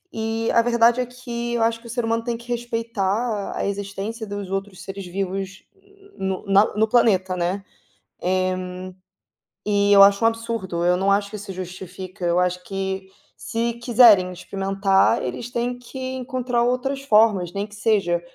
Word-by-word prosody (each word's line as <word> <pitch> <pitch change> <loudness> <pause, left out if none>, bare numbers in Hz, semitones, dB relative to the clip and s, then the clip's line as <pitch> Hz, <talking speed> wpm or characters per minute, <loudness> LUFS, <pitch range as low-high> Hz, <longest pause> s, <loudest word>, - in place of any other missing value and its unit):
E 225 +1 -1
a 230 - +5
verdade, 235 +1 +3
é - - -1
que 240 -1 -5
eu 230 - +1
acho 230 0 0
que 240 - -13
o - - -10
ser 240 0 -2
humano 230 0 0
tem 235 -1 -2
que 235 +1 -15
respeitar 230 -2 -2
a - - -2
existência 200 +3 -4
dos 200 -2 -5
outros 195 -1 -4
seres 195 0 -7
vivos 195 +1 -4 0.5
no 190 +1 -3
na 195 +1 +5
no 220 - +3
planeta, 190 -6 +3
né, 180 +3 -2 0.6
eh, 185 0 0 0.9
e 205 -1 +3
eu 200 -1 +9
acho 200 +3 +6
um - - +7
absurdo, 225 -7 -3
eu 180 0 +3
não 195 +2 +2
acho 200 0 +1
que 215 - -6
isso 200 -1 -7
justifica, 185 +1 -8
eu 175 +1 +2
acho 180 0 0
que 190 0 -4 0.3
se 230 +1 -2
quiserem 230 -6 +5
experimentar, 195 +1 +1
eles 130 - -5
têm 245 +1 -2
que 245 +2 -10 0.2
encontrar 250 -2 -1
outras 265 +3 -1
formas 210 -8 +3
nem 200 0 -2
que 205 - -15
seja 195 -6 +1
205 Hz, 170 wpm, -22 LUFS, 190-230 Hz, 0.9 s, eu